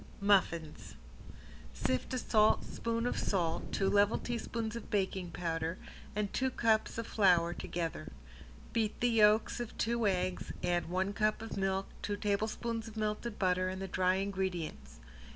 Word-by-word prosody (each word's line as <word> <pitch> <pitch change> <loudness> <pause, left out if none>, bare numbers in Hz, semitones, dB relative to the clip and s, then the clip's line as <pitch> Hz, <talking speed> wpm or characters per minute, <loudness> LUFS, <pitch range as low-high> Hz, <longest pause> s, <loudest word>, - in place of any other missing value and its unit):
~MUFFINS~ 185 -6 +1 0.8
Sift 130 - -1
a - - 0
saltspoon 230 +1 +1
of 245 - 0
salt, 170 -4 -1
two 195 - +1
level 205 +2 +4
teaspoons 230 -1 -3
of 235 - -7
baking 190 -3 -1
powder, 165 0 -2 0.4
and 210 -1 -1
two 260 0 +1
cups 220 -3 +1
of 230 - -2
flour 175 -5 +3
together. 165 -4 -4 0.6
Beat 220 -2 0
the 245 0 +2
yolks 215 +1 +4
of 240 -2 -5
two 235 -1 +1
eggs, 185 -1 -1
add 175 -1 0
one 190 +3 0
cup 215 +1 +1
of 225 - -6
milk, 195 0 0 0.2
two 205 -1 -2
tablespoons 220 +3 -1
of 220 0 -10
melted 215 +1 -2
butter, 185 -1 +2
and 185 0 -4
the 195 - -4
dry 185 0 +2
ingredients. 190 -4 -3
200 Hz, 150 wpm, -33 LUFS, 185-220 Hz, 0.8 s, level